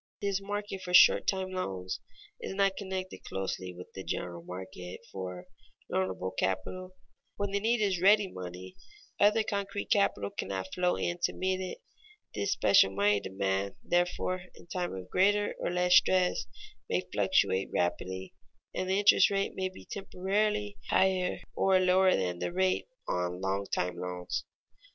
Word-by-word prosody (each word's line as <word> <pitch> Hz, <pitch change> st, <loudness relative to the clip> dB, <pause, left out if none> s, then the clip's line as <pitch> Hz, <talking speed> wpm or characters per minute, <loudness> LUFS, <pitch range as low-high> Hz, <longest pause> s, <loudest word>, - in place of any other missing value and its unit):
This 200 Hz, -1 st, -1 dB
market 205 Hz, -1 st, -4 dB
for 180 Hz, -1 st, 0 dB
short -, -, +7 dB
time 190 Hz, -1 st, 0 dB
loans 95 Hz, -, -3 dB, 0.4 s
is -, -, -5 dB
not 195 Hz, -1 st, +2 dB
connected 190 Hz, -2 st, -5 dB
closely 95 Hz, -1 st, -4 dB
with 90 Hz, 0 st, -11 dB
the 95 Hz, -, -7 dB
general 85 Hz, -2 st, -4 dB
market 90 Hz, 0 st, -8 dB
for 90 Hz, -2 st, -6 dB, 0.5 s
loanable 95 Hz, 0 st, -1 dB
capital. 185 Hz, -, -2 dB, 0.4 s
When 200 Hz, -1 st, -2 dB
the 200 Hz, -, +1 dB
need 225 Hz, +2 st, +1 dB
is 195 Hz, -3 st, +2 dB
for 175 Hz, -, -2 dB
ready 205 Hz, +1 st, +6 dB
money, 90 Hz, -, -8 dB, 0.4 s
other 210 Hz, +2 st, +5 dB
concrete 200 Hz, -1 st, -3 dB
capital 100 Hz, -, +2 dB
cannot 95 Hz, -1 st, -4 dB
flow 180 Hz, 0 st, +2 dB
in 175 Hz, 0 st, -2 dB
to -, -, -1 dB
meet 185 Hz, 0 st, -1 dB
it. 190 Hz, -, -6 dB, 0.5 s
This 200 Hz, -, -1 dB
special 100 Hz, -1 st, +5 dB
money 100 Hz, +1 st, +3 dB
demand, 95 Hz, 0 st, -2 dB
therefore, 180 Hz, +1 st, 0 dB
in -, -, -15 dB
time 175 Hz, -, -3 dB
of 95 Hz, -1 st, -7 dB
greater 205 Hz, +2 st, +3 dB
or -, -, -1 dB
less 180 Hz, 0 st, +2 dB
stress, 185 Hz, -1 st, +2 dB, 0.4 s
may -, -, +1 dB
fluctuate 95 Hz, +1 st, +2 dB
rapidly, 95 Hz, +2 st, -2 dB, 0.4 s
and 185 Hz, -, -2 dB
the 190 Hz, -, +2 dB
interest 205 Hz, +1 st, +6 dB
rate 195 Hz, -1 st, -1 dB
be 185 Hz, 0 st, -4 dB
temporarily 205 Hz, +2 st, -1 dB
higher 185 Hz, -1 st, +2 dB, 0.2 s
or 190 Hz, -1 st, +3 dB
lower 185 Hz, +1 st, +4 dB
than 90 Hz, -2 st, -1 dB
the 90 Hz, -, -2 dB
rate 185 Hz, -, +1 dB, 0.2 s
on 90 Hz, 0 st, -1 dB
long 95 Hz, +1 st, -1 dB
time 90 Hz, 0 st, -1 dB
loans. 90 Hz, 0 st, -4 dB
180 Hz, 155 wpm, -30 LUFS, -, 0.5 s, short